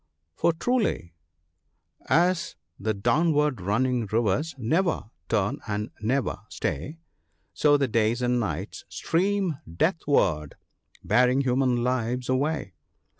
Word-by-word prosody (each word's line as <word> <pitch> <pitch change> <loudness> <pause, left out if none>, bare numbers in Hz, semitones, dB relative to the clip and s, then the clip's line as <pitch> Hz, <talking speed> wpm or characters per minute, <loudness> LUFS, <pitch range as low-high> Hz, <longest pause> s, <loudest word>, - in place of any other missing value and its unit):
For 170 - +2
truly 190 - -1 0.5
— - - -29 0.2
"As 180 -1 -2 0.2
the 110 +1 -1
downwa>\i 150 +7 +2
running 120 +4 +1
rivers 115 +8 0
never 155 - 0 0.2
turn 105 -3 0
and 105 +1 -3
never 130 +5 0
stay, 115 - -3 0.6
So 145 -1 +4
the 140 -1 +1
days 115 +1 +1
and 125 0 +2
nights 110 - -4
stream 185 -3 0
deathward, 90 - +1 0.5
bearing 125 +2 +3
human 125 -2 +1
lives 125 0 -1
away." 135 - 0
125 Hz, 110 wpm, -26 LUFS, 110-155 Hz, 0.6 s, So